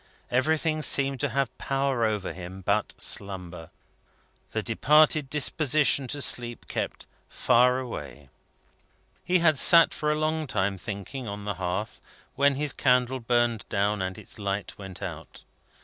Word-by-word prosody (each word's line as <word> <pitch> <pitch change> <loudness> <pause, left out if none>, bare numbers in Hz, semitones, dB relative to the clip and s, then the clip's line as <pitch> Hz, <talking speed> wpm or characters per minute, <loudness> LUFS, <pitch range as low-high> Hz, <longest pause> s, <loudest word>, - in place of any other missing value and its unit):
Everything 155 +4 +1
seemed 140 -2 +3
to 145 - -1
have 135 -3 -2
power 135 -3 -1
over 105 -3 -2
him 95 +1 -9
but 100 +3 -1
slumber. 90 -4 -2 0.8
The 110 - -3
departed 150 +5 +3
disposition 145 -1 +2
to 145 +2 -1
sleep 120 -2 0
kept - - -4 0.2
far 125 +2 +3
away. 75 - -7 0.9
He 185 - +2
had 155 -4 +4
sat 170 -2 +6
for 150 0 -1
a - - +1
long 155 0 -1
time 95 -4 -1
thinking, 110 +6 -6
on 100 0 -6
the 105 - -2
hearth, 95 +4 -3 0.3
when 140 0 +2
his 145 -1 -1
candle 125 0 +1
burned 120 -1 0
down 100 0 0
and 95 0 -4
its - - -9
light 100 0 -4
went 95 -1 -10
out. 80 -4 -8
120 Hz, 145 wpm, -26 LUFS, 100-140 Hz, 0.9 s, sat